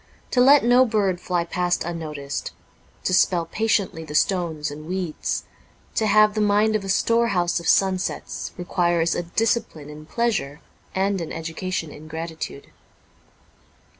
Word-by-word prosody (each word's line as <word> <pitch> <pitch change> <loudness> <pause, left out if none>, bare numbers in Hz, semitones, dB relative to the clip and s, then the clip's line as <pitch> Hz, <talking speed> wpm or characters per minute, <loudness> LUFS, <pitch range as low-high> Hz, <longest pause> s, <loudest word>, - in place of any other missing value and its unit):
To 250 - +3
let 280 +3 +7
no 245 +2 +6
bird 200 -6 0
fly 175 -2 0
past 180 +1 -1
unnoticed, 155 -4 -5 0.5
to - - 0
spell 175 -2 +3
patiently 200 -3 0
the 150 -1 -8
stones 165 -5 0
and 155 +2 -9
weeds, 180 -3 -2 0.5
to 220 - +1
have 215 0 +5
the 215 - -1
mind 210 +1 +3
a 195 -2 -2
storehouse 200 -5 +2
of 170 - -7
sunsets, 190 -1 0
requires 175 -2 +1
a - - -1
discipline 175 -5 -1
in 155 +1 -11
pleasure 205 -9 -1 0.4
and 195 0 +1
an 165 - -5
education 165 0 -4
in 155 +2 -11
gratitude. 160 -3 -6
180 Hz, 135 wpm, -23 LUFS, 160-210 Hz, 0.5 s, let